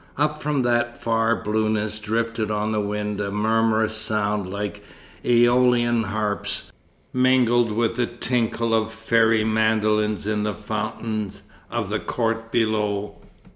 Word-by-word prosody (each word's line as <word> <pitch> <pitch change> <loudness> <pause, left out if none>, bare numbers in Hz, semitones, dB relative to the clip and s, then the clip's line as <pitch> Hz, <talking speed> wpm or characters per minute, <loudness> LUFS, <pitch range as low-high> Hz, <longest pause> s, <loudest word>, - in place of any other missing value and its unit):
Up 150 +1 0
from 145 -3 0
that 120 0 0
far 115 0 +1
blueness 110 0 -1
drifted 115 0 -1
on 105 0 -1
the 105 -1 0
wind 105 0 -3
a 100 - -2
murmurous 110 +1 +1
sound 105 -3 -1
like 105 +1 -4 0.4
Æolian 120 -1 +3
harps, 105 -1 -2 0.4
mingled 125 -2 +3
with 115 +2 0
the 120 -1 +1
tinkle 115 -1 -1
of 110 0 +1
fairy 115 0 +2
mandolins 110 -1 +1
in 105 0 0
the 105 0 -2
fountain 110 0 -3 0.4
of 110 -4 -3
the 110 - 0
court 115 -1 -2
below. 105 -3 0
110 Hz, 130 wpm, -23 LUFS, 105-115 Hz, 0.4 s, Æolian